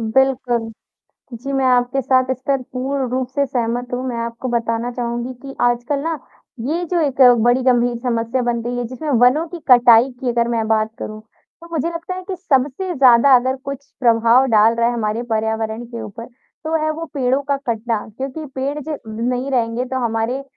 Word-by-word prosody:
बिल्कुल। 240 Hz, 0 st, +1 dB, 0.6 s
जी, 250 Hz, +4 st, -6 dB
मैं 270 Hz, -1 st, +1 dB
आपके 250 Hz, +1 st, +2 dB
साथ 255 Hz, +1 st, +3 dB
इस 260 Hz, -, -2 dB
पर 275 Hz, -2 st, +1 dB
पूर्ण 265 Hz, 0 st, -2 dB
रूप 255 Hz, 0 st, -1 dB
से 280 Hz, -, +2 dB
सहमत 245 Hz, -1 st, -2 dB
हूँ, 250 Hz, +1 st, -2 dB
मैं 240 Hz, -2 st, -3 dB
आपको 235 Hz, +2 st, -6 dB
बताना 230 Hz, 0 st, -1 dB
चाहूँगी 240 Hz, +1 st, -3 dB
कि 275 Hz, -1 st, -9 dB
आजकल 245 Hz, +4 st, +1 dB
ना, 325 Hz, +3 st, -2 dB, 0.5 s
ये 335 Hz, +4 st, -1 dB
जो 350 Hz, -, +2 dB
एक 275 Hz, -3 st, 0 dB, 0.2 s
बड़ी 240 Hz, +2 st, +3 dB
गंभीर 245 Hz, -1 st, +2 dB
समस्या 235 Hz, +1 st, -1 dB
बन 240 Hz, -1 st, -1 dB
गई 240 Hz, +1 st, -4 dB
है। 245 Hz, -, -1 dB
जिसमें 260 Hz, +6 st, -6 dB
वनों 260 Hz, +7 st, +4 dB
की 345 Hz, +1 st, -8 dB
कटाई 245 Hz, 0 st, +7 dB
की 260 Hz, -2 st, -2 dB
अगर 235 Hz, -1 st, +1 dB
मैं 225 Hz, -2 st, -1 dB
बात 220 Hz, 0 st, +1 dB
करूँ, 215 Hz, 0 st, -6 dB
तो 280 Hz, +9 st, -20 dB
मुझे 325 Hz, -1 st, -1 dB
लगता 335 Hz, +2 st, -5 dB
है 370 Hz, -, -7 dB
कि 385 Hz, -, -3 dB
सबसे 305 Hz, +1 st, 0 dB
ज़्यादा 260 Hz, -1 st, +6 dB
अगर 255 Hz, +1 st, +2 dB
कुछ 280 Hz, 0 st, -6 dB
प्रभाव 235 Hz, +1 st, +4 dB
डाल 225 Hz, -1 st, +4 dB
रहा 235 Hz, 0 st, +2 dB
है 245 Hz, -, 0 dB
हमारे 225 Hz, 0 st, -2 dB
पर्यावरण 220 Hz, +1 st, -2 dB
के 235 Hz, -1 st, -7 dB
ऊपर, 230 Hz, +3 st, -8 dB, 0.4 s
तो 315 Hz, +1 st, -1 dB
है 310 Hz, -, +1 dB
वो 325 Hz, +2 st, -5 dB
पेड़ों 265 Hz, 0 st, +1 dB
का 280 Hz, -, +2 dB
कटना। 225 Hz, -1 st, -1 dB
क्योंकि 275 Hz, +4 st, -5 dB
पेड़ 275 Hz, +3 st, -2 dB
ज 305 Hz, +1 st, -5 dB
ब 220 Hz, 0 st, -7 dB
नहीं 255 Hz, +2 st, -2 dB
रहेंगे 235 Hz, 0 st, 0 dB
तो 260 Hz, +1 st, -3 dB
हमारे 230 Hz, +4 st, -1 dB
250 Hz, 200 wpm, -19 LUFS, 235-270 Hz, 0.6 s, कटाई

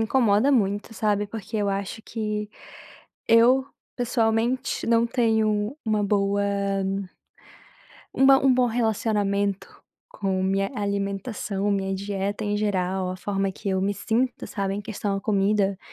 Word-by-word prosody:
incomoda 225 Hz, +1 st, +3 dB
muito, 205 Hz, -4 st, +1 dB
sabe, 210 Hz, -1 st, 0 dB
porque 220 Hz, +1 st, -6 dB
eu 205 Hz, -1 st, 0 dB
acho 195 Hz, +2 st, -3 dB
que, 210 Hz, -2 st, -3 dB, 0.8 s
eu 240 Hz, +4 st, +5 dB, 0.3 s
pessoalmente 235 Hz, 0 st, 0 dB
não 230 Hz, 0 st, +3 dB
tenho 220 Hz, -1 st, +1 dB
uma 215 Hz, -2 st, +1 dB
boa 200 Hz, 0 st, +1 dB, 1.7 s
um 270 Hz, -, +4 dB
bom 270 Hz, 0 st, +6 dB
um 265 Hz, -, +6 dB
bom 250 Hz, 0 st, +3 dB
relacionamento 205 Hz, -4 st, -1 dB, 0.3 s
com 195 Hz, -, -2 dB
minha 195 Hz, +1 st, +1 dB
alimentação, 200 Hz, 0 st, -2 dB
minha 195 Hz, -1 st, 0 dB
dieta 200 Hz, +2 st, -3 dB
em 205 Hz, 0 st, 0 dB
geral, 190 Hz, -3 st, -1 dB
a 185 Hz, -, -5 dB
forma 195 Hz, 0 st, -2 dB
que 200 Hz, -, -6 dB
eu 190 Hz, -1 st, +1 dB
me 200 Hz, +1 st, 0 dB
sinto, 240 Hz, +5 st, -1 dB
sabe, 195 Hz, -2 st, -2 dB
em 205 Hz, -, -3 dB
questão 205 Hz, -2 st, -3 dB
a -, -, -3 dB
comida, 200 Hz, -1 st, +1 dB
205 Hz, 135 wpm, -25 LUFS, 195-225 Hz, 1.7 s, bom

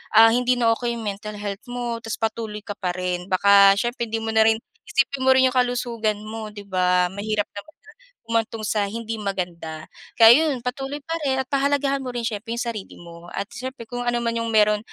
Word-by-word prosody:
ah 225 Hz, +1 st, +8 dB
hindi 250 Hz, +1 st, +2 dB
na 230 Hz, -1 st, +4 dB
okey 235 Hz, 0 st, -2 dB
'yong 230 Hz, -, -6 dB
mental 210 Hz, +1 st, -5 dB
health 205 Hz, -1 st, -5 dB
mo 240 Hz, -1 st, -3 dB
tas 225 Hz, -, -3 dB
patuloy 220 Hz, -1 st, -3 dB
ka 205 Hz, -, -6 dB
pa 185 Hz, -3 st, -2 dB
rin 180 Hz, 0 st, -3 dB
baka 200 Hz, +1 st, +6 dB
siyempre 240 Hz, 0 st, -2 dB
hindi 225 Hz, +1 st, -2 dB
mo 225 Hz, -, -2 dB
na 220 Hz, 0 st, +5 dB
rin 220 Hz, 0 st, +4 dB, 0.3 s
isipin 275 Hz, 0 st, +1 dB
mo -, -, +4 dB
rin 260 Hz, 0 st, +5 dB
'yong 255 Hz, -, -3 dB
kalusugan 240 Hz, -4 st, 0 dB
mo 215 Hz, 0 st, -6 dB
'di 205 Hz, -1 st, -9 dB
ba 180 Hz, -1 st, +2 dB
mahirap 205 Hz, +1 st, -1 dB
naman 205 Hz, +10 st, -9 dB, 0.5 s
humantong 225 Hz, -1 st, -2 dB
sa 210 Hz, -1 st, 0 dB
hindi 225 Hz, +2 st, -5 dB
maganda 175 Hz, -6 st, -4 dB, 0.4 s
kaya 240 Hz, +8 st, +8 dB
'yon 255 Hz, -, -4 dB
patuloy 270 Hz, +3 st, -4 dB
pa 330 Hz, +2 st, -3 dB
rin 265 Hz, -1 st, +1 dB
at 265 Hz, -, -17 dB
pahalagahan 275 Hz, 0 st, +1 dB
mo 250 Hz, -, -4 dB
rin 240 Hz, -, -2 dB
siyempre 225 Hz, 0 st, -5 dB
'yong 235 Hz, -, -3 dB
sarili 215 Hz, -4 st, -8 dB
mo 170 Hz, 0 st, -12 dB
at 200 Hz, -, -3 dB
siyempre 255 Hz, +1 st, -7 dB
kung 245 Hz, +1 st, -4 dB
ano 240 Hz, 0 st, +1 dB
man 230 Hz, 0 st, -1 dB
'yong 230 Hz, -, -2 dB
mayro'n 210 Hz, -1 st, +4 dB
225 Hz, 215 wpm, -23 LUFS, 205-245 Hz, 0.5 s, ah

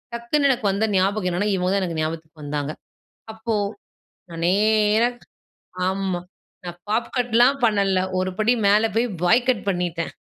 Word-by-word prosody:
டக்குனு 260 Hz, +5 st, +1 dB
எனக்கு 245 Hz, -5 st, -1 dB
வந்த 200 Hz, +3 st, 0 dB
ஞாபகம் 190 Hz, 0 st, +1 dB
என்னென்னா, 195 Hz, +4 st, 0 dB
இவங்க 180 Hz, -1 st, 0 dB
தான் 200 Hz, -, +1 dB
எனக்கு 165 Hz, -3 st, -3 dB
ஞாபகத்துக்கு 155 Hz, 0 st, -5 dB
வந்தாங்க. 145 Hz, 0 st, -3 dB, 0.6 s
அப்போ, 220 Hz, +1 st, -3 dB, 0.8 s
நான் 165 Hz, 0 st, -6 dB
நேரா 215 Hz, +3 st, +3 dB, 0.8 s
ஆமா. 190 Hz, -2 st, -2 dB, 0.4 s
நான் 175 Hz, 0 st, -7 dB
பாப் 230 Hz, +2 st, -1 dB
கட்லாம் 245 Hz, +3 st, +3 dB
பண்ணல, 200 Hz, -4 st, +2 dB, 0.2 s
ஒருபடி 190 Hz, +5 st, +1 dB
மேலே 210 Hz, +3 st, +4 dB
போய் 240 Hz, +2 st, +2 dB, 0.2 s
பாய் 240 Hz, +8 st, +3 dB
கட் 235 Hz, -6 st, 0 dB
பண்ணிட்டேன். 175 Hz, -3 st, -2 dB
200 Hz, 140 wpm, -22 LUFS, 175-225 Hz, 0.8 s, மேலே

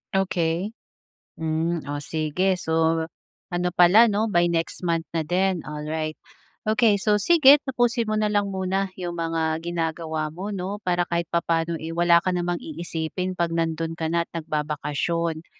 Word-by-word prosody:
Okey, 180 Hz, 0 st, 0 dB, 0.7 s
hmm, 160 Hz, +1 st, -1 dB
oh, 145 Hz, 0 st, -4 dB
sige, 160 Hz, +5 st, 0 dB
so 160 Hz, -1 st, +1 dB, 0.5 s
ano 175 Hz, 0 st, 0 dB
pala, 180 Hz, +6 st, +6 dB
'no, 210 Hz, +1 st, +1 dB
by 175 Hz, 0 st, +4 dB
next 165 Hz, -1 st, -2 dB
month 165 Hz, -2 st, 0 dB
na 165 Hz, -, 0 dB
din, 180 Hz, +2 st, 0 dB
alright. 155 Hz, +1 st, -4 dB, 0.5 s
Okey, 215 Hz, -1 st, +3 dB
so 210 Hz, +1 st, +1 dB
sige, 295 Hz, -, +7 dB
tapusin 240 Hz, -4 st, 0 dB
mo 215 Hz, -, 0 dB
na 210 Hz, -1 st, +1 dB
lang 205 Hz, -1 st, +1 dB
muna 190 Hz, 0 st, -1 dB
'yong 175 Hz, -2 st, -4 dB
mga 165 Hz, -1 st, -1 dB
ginagawa 160 Hz, -2 st, -3 dB
mo, 190 Hz, +5 st, -5 dB
'no, 200 Hz, +1 st, -4 dB
para 175 Hz, -2 st, +1 dB
kahit 170 Hz, 0 st, -2 dB
papaano, 165 Hz, -1 st, 0 dB
eh, 160 Hz, +1 st, -6 dB
wala 170 Hz, 0 st, +5 dB
ka 180 Hz, +2 st, 0 dB
namang 175 Hz, 0 st, -1 dB
iisipin 170 Hz, +3 st, -4 dB
'pag 170 Hz, -1 st, 0 dB
nando'n 165 Hz, 0 st, -1 dB
ka 160 Hz, -1 st, -3 dB
na 170 Hz, 0 st, +1 dB
at -, -, -56 dB
nagbabakasyon. 155 Hz, +1 st, -2 dB
170 Hz, 160 wpm, -24 LUFS, 160-190 Hz, 0.7 s, sige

